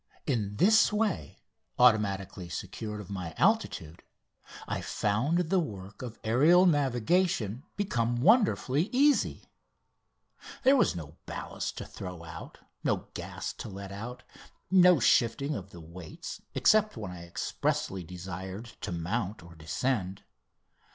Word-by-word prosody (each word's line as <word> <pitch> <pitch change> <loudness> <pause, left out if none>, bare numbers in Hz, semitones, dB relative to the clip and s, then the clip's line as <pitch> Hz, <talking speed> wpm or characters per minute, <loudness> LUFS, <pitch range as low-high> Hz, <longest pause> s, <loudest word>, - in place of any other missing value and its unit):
In 105 -7 -1
this 220 - +5
way, 210 - -2 0.3
automatically 100 -6 +2
secure 105 +3 -5
of 100 -2 -9
my 90 -4 -5
altitude, 140 - +1 0.7
I - - -2
found 145 +12 0
the 190 - +4
work 100 - -6
of 120 -3 -7
aerial 150 +11 +5
navigation 135 - +1 0.2
become 120 - 0
wonderfully 185 - +3
easy. 280 +3 +3 1.2
There 265 +2 +6
was 250 - +3
no 80 -2 -8
ballast - - -5
to - - -5
throw 90 -3 -8
out, 80 0 -9 0.3
no - - -1
gas - - -5
to - - -8
let 100 0 -8
out, 115 +5 -7 0.5
no 180 -3 +7
shifting 125 +5 +3
of 100 -7 -6
the 85 - -12
weights 85 +1 -9
except 215 - +4
when 105 -4 -5
I 90 -1 -9
expressly 95 +2 -2
desired 95 +5 -7
to - - -4
mount 95 +4 -2
or 85 0 -13
descend. 95 +5 -2
110 Hz, 125 wpm, -29 LUFS, -, 1.2 s, no